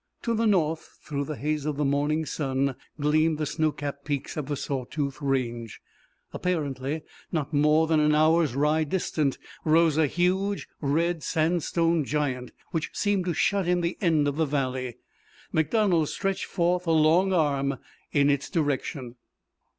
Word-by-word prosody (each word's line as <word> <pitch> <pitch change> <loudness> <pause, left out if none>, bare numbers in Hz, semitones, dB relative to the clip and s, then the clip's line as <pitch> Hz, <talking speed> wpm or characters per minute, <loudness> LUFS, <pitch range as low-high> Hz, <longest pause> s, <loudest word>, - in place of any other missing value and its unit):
To 235 - 0
the 225 0 +1
north 165 -6 0
through 140 -1 -3
the 155 - -4
haze 150 +1 -2
of 150 -2 -2
the 150 - +1
morning 145 +3 +1
sun 135 -3 -1 0.2
gleamed 155 +2 +2
the 155 - -1
snow 155 +1 0
capped 140 -1 -6
peaks 145 -2 -3
of 150 -3 -4
the 145 - -1
Saw 135 -1 -3
Tooth 140 +1 -4
Range. 120 -5 -2 0.5
Apparently 150 -4 -2 0.3
not 155 -3 -2
more 150 +2 +4
than 160 -1 +2
an 150 0 +3
hour's 155 -2 +3
ride 150 +2 +2
distant 155 -6 0 0.3
rose 160 -1 +4
a 155 - +4
huge 190 +5 0
red 165 +3 +1
sandstone 165 0 +1
giant 135 -4 -2 0.2
which 165 -2 -2
seemed 205 -3 0
to 175 -3 -1
shut 200 -3 +1
in 180 0 +2
the 170 +1 -1
end 160 -6 +3
of 145 0 -2
the 160 - +2
valley 130 -3 -2 0.5
MacDonald 165 0 +2
stretched 195 -1 -2
forth 175 0 0
a - - +3
long 160 +4 +4
arm 140 -5 +1 0.3
in 145 -1 +4
its 140 -1 -1
direction. 140 -5 -2
155 Hz, 160 wpm, -26 LUFS, 140-170 Hz, 0.5 s, more